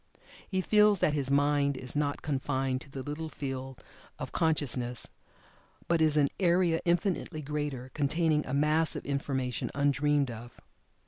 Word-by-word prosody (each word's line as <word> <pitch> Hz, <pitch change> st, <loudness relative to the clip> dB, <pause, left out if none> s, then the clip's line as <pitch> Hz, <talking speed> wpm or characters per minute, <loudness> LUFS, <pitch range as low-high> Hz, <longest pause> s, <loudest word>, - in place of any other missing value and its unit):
He 190 Hz, -2 st, 0 dB
feels 210 Hz, +1 st, +4 dB
that 155 Hz, -, +2 dB
his 140 Hz, -3 st, -1 dB
"mind" 140 Hz, 0 st, +2 dB
is 130 Hz, +1 st, -4 dB
not 145 Hz, -1 st, -1 dB
confined 135 Hz, -2 st, -1 dB
to -, -, -11 dB
the 135 Hz, -1 st, -6 dB
little 150 Hz, +3 st, -5 dB
field 135 Hz, -2 st, -6 dB, 0.3 s
of -, -, -6 dB
consciousness, 130 Hz, -6 st, +1 dB, 0.8 s
but 170 Hz, -1 st, +2 dB
is 155 Hz, -1 st, +3 dB
an 140 Hz, -2 st, +4 dB
area 175 Hz, -2 st, +3 dB
infinitely 170 Hz, -2 st, 0 dB
greater, 140 Hz, -3 st, -4 dB
containing 150 Hz, +1 st, +1 dB
a 130 Hz, -, -4 dB
mass 155 Hz, +2 st, +2 dB
of -, -, -6 dB
information 135 Hz, -3 st, -2 dB
undreamed 145 Hz, -1 st, +2 dB
of. 120 Hz, +1 st, -10 dB
145 Hz, 145 wpm, -30 LUFS, 135-160 Hz, 0.8 s, feels